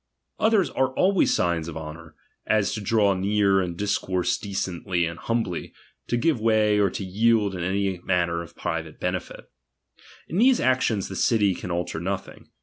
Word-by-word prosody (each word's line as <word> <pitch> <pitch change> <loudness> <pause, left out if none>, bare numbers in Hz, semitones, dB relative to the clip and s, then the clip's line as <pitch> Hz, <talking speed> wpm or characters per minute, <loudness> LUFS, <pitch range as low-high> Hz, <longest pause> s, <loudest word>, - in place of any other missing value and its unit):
Others 215 -4 +3
are 130 0 0
always 190 0 +3
signs 85 -2 0
of 80 -2 -6
honour, 80 +1 -9 0.3
as 110 -3 +2
to 110 - -4
draw 100 -1 +3
near 100 0 +2
and 85 -2 -4
dis 100 +1 0
course 90 -1 0
decently 90 -3 -2
and 85 0 -5
humbly, 115 -7 -2 0.3
to 120 - 0
give 125 -1 +1
way 110 -2 +3
or 100 -1 +3
to 100 - -5
yield 105 +1 +2
m 90 - -5
any 95 +1 -1
matter 85 -2 0
of 85 0 -11
private 80 -2 -4
benefit. - - -4 0.8
In 170 - -2
these 255 +2 +5
actions 125 -6 +1
the 95 - -7
city 105 -2 +2
can 90 - -7
alter 85 -2 -2
nothing. 95 +3 -5
95 Hz, 170 wpm, -25 LUFS, 85-110 Hz, 0.8 s, these